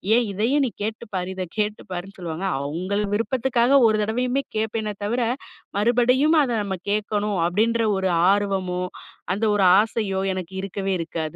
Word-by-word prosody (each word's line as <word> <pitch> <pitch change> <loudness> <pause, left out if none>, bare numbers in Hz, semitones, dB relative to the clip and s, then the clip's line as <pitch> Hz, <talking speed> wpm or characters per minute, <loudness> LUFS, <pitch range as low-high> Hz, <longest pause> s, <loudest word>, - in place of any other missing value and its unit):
ஏன் 240 - +3
இதையும் 245 +9 +2
நீ - - -5
கேட்டுப்பாரு. 210 -4 -4
இத 185 -1 -3
கேட்டு 210 0 -1
பாருன்னு" 185 +2 -6
சொல்லுவாங்க. 170 +1 -4 0.2
அவுங்கள் 185 +8 -2
விருப்பத்துக்காக 255 +2 +2
ஒரு 215 -1 +2
தடவையுமே 250 +5 0
கேட்பேனே 215 -1 -2
தவிர, 240 +3 0 0.5
மறுபடியும் 250 +8 +3
அத 250 - -2
நம்ம 190 -2 -3
கேட்கணும் 210 -1 -1
அப்பிடின்ற 225 +5 +1
ஒரு 190 -1 0 0.2
ஆர்வமோ 190 -3 0 0.5
அந்த 210 +3 -3
ஒரு 195 -2 +3 0.2
ஆசையோ 210 -4 -2
எனக்கு 185 0 -6
இருக்கவே 195 0 -2
இருக்காது. 160 -2 -4
210 Hz, 145 wpm, -23 LUFS, 190-230 Hz, 0.5 s, ஏன்